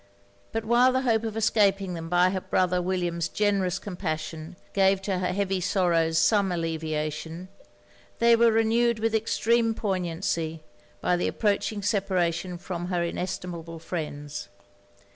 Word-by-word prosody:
But 225 0 -3
while 240 +3 +5
the 260 +1 0
hope 225 -3 +2
of 220 -1 -4
escaping 200 -3 +2
them 165 -1 -6
by 180 +1 +4
her 190 -1 -2
brother 180 -1 +1
William's 175 -2 -1
generous 200 -3 +1
compassion, 160 -3 -5 0.2
gave 195 0 +4
to 195 -2 -1
her 180 - 0
heavy 195 0 -1
sorrows 170 -3 +2
some 200 +2 +3
alleviation, 160 +1 -3 0.7
they 235 0 +5
were 230 0 +5
renewed 225 +1 +2
with 225 +1 0
extreme 225 +1 +2
poignancy, 170 -5 -2 0.4
by 180 0 +2
the 175 - 0
approaching 205 -1 0
separation 185 -3 0
from 175 -1 -5
her 175 -2 0
inestimable 170 -1 -4
friends. 145 - -5
185 Hz, 135 wpm, -26 LUFS, 170-210 Hz, 0.7 s, while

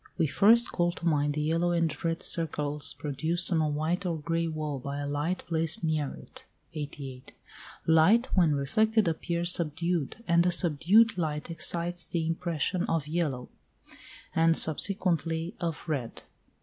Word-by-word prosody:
We - - +2
first 220 +10 +4
call 175 -1 0
to 170 - -9
mind 145 -3 +1
the 150 - -1
yellow 165 +3 0
and 165 -3 -1
red 165 -1 -2
circles 150 -3 -1
produced 160 +6 -2
on 165 -2 +2
a 155 - +1
white 155 +6 -2
or 170 -3 -2
grey 165 +2 -2
wall 155 -3 -4
by 140 +2 -5
a 145 - -4
light 145 +5 -2
placed 165 0 -1
near 155 -3 -1
it - - -12 0.3
(88). 140 -4 -8 0.5
Light 175 +10 +4
when 165 -6 +3
reflected 215 +10 +1
appears 170 +1 0
subdued, 170 - -2
and 170 0 +4
a 180 - +2
subdued 180 +6 +3
light 155 0 -3
excites 175 +1 +1
the 165 -2 -2
impression 165 +1 -2
of 165 -3 -1
yellow, 150 -6 -2 0.9
and 165 0 +4
subsequently 165 0 +3
of 170 -1 -4
red. 135 -7 -4
165 Hz, 150 wpm, -28 LUFS, 150-175 Hz, 0.9 s, first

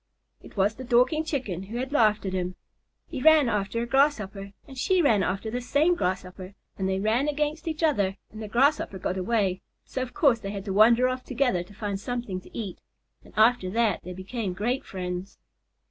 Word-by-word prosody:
It - - -15
was 200 +2 +3
the 260 - -9
Dorking 255 +6 +3
Chicken 255 - -3
who 205 +5 -6
had 260 +2 -3
laughed 215 -7 +3
at 190 - -2
him. 180 -1 -2 0.5
He 275 -6 -6
ran 315 -2 +6
after 210 +1 -1
a - - -2
Grasshopper, 215 -7 +1
and 270 - -11
she 370 +8 +2
ran 230 - +4
after 195 +4 -2
the 245 +2 -2
same 295 +8 +3
Grasshopper, 185 - -3 0.2
and 190 -1 -2
they 190 0 0
ran 225 +7 +1
against 300 +2 -2
each 320 0 -3
other 200 -11 +2
and 215 - -9
the 215 - -5
Grasshopper 250 -2 +2
got 185 0 -2
away, 195 -2 0 0.2
so 260 - -4
of 255 0 -5
course 270 -7 +4
they 195 - -6
had 200 -1 -5
to 195 - -2
wander 230 +5 +6
off 255 0 -3
together 250 -8 0
to 180 +4 -12
find 205 -2 -3
something 225 -4 -4
to - - -12
eat, 205 -6 -5 0.4
and - - -17
after 220 -3 +4
that 220 -1 +1
they 180 - -7
became 190 +2 -4
great 240 +8 -1
friends. 180 0 -5
220 Hz, 205 wpm, -26 LUFS, 195-260 Hz, 0.5 s, ran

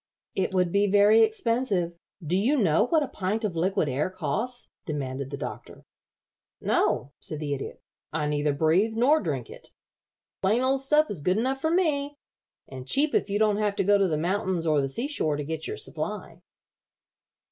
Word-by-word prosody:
"It 190 - -1
would 180 -2 +2
be 200 +2 +3
very 205 +3 +5
expensive. 220 -5 +1 0.3
Do 170 +4 0
you 240 +10 +2
know 190 - +3
what 315 0 +3
a - - -3
pint 210 +2 -2
of 190 -5 -3
liquid 175 -1 +1
air 140 +6 -1
costs?" 185 - -3 0.2
demanded 135 -3 -4
the 140 - -5
Doctor. - - -8 0.7
"No," 135 - 0
said 155 - -3
the 145 -2 -2
Idiot. 135 - -6 0.3
"I 155 -1 -1
neither 150 0 0
breathe 165 +9 +2
nor 270 +7 +4
drink 140 - -3
it. - - -14 0.7
The 190 - +1
plain 230 +6 +2
old 265 +1 +2
stuff 300 +2 +2
is 180 -8 -5
good 180 +6 +1
enough 265 +4 -1
for 315 - +1
me, 295 -5 +1 0.5
and 130 -1 -9
cheap 290 - +2
if - - +1
you 200 - 0
don't 210 -1 +2
have 210 -1 0
to - - +1
go 205 +1 +4
to 195 - +3
the 155 -3 0
mountains 180 +1 -1
or 155 -3 +3
the 135 - -2
sea 235 - -2
shore 155 - 0
to 145 - -3
get 160 +2 -4
your 430 - -4
supply." - - -6
195 Hz, 190 wpm, -26 LUFS, 155-235 Hz, 0.7 s, very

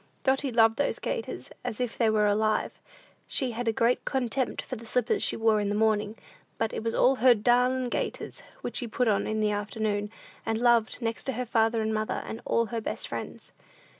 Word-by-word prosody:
Dotty 270 0 +1
loved 225 -1 +4
those 285 - 0
gaiters 475 -2 -4
as 215 - -4
if 245 -2 -2
they 230 -2 +2
were 215 -1 +3
alive. 215 +1 +1 0.6
She 260 -3 0
had 235 +1 -4
a - - +4
great 230 +3 +1
contempt 260 0 -1
for - - -5
the 230 +1 -10
slippers 245 0 +1
she - - +1
wore 225 -1 +3
in 205 - -1
the 205 - 0
morning, 215 0 +1 0.4
but 225 -1 -1
it - - -4
was 230 0 -1 0.2
her 250 +1 +6
"darlin' 250 +3 +2
gaiters," - - -4 0.2
which - - -4
she 245 - -2
put 245 +2 0
on 205 -2 +2
in 215 0 -1
the 210 -1 +2
afternoon, 205 0 -2 0.3
and 225 - -1
loved 235 0 +2
next 230 0 -2
to 250 -2 -2
father 225 -1 +2
and 220 0 -1
mother, 215 0 -2
and 225 - -6
all 230 - +2
her 230 - -1
best - - -3
friends. - - -7
225 Hz, 200 wpm, -28 LUFS, 215-245 Hz, 0.6 s, her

